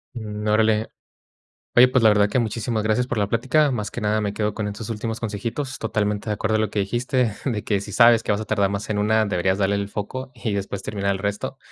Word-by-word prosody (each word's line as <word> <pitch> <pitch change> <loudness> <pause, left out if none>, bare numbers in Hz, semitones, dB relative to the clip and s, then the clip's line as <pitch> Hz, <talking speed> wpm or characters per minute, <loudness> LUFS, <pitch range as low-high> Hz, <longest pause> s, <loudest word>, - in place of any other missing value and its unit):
Mm, 105 -2 -5
órale. 110 +1 +2 0.9
Oye, 125 +1 +8
pues, 130 -1 +2
la 110 - +8
verdad 105 -1 +4
que 130 - 0
muchísimas 115 -1 -1
gracias 110 +3 +1
por 125 - -3
la 100 -1 +1
plática. 135 +7 +2
Más 105 -5 -3
que - - -6
nada, 105 +1 +1
me 105 -1 -2
quedo 105 0 -1
con 105 -2 -3
estos 105 +2 -6
últimos 110 0 -4
consejitos, 115 +5 -4
totalmente 105 -1 -1
de 105 - +1
acuerdo 110 +1 0
a - - +1
lo 110 - +1
que 105 - -1
dijiste, 120 +3 0
de 110 -6 -1
que 100 -2 0
si - - -8
sabes 115 -1 +6
que - - -3
vas 105 - -1
a - - -5
tardar 100 -2 +1
más 100 +2 -4
en 105 - 0
una, 110 +1 +3
deberías 95 -2 0
darle 100 0 +1
el 100 0 -2
foco 130 +6 -5
y 115 -2 -3
después 100 -1 -3
terminar 100 -1 -1
el 95 - -3
resto. 100 +1 -3
105 Hz, 245 wpm, -23 LUFS, 105-115 Hz, 0.9 s, Oye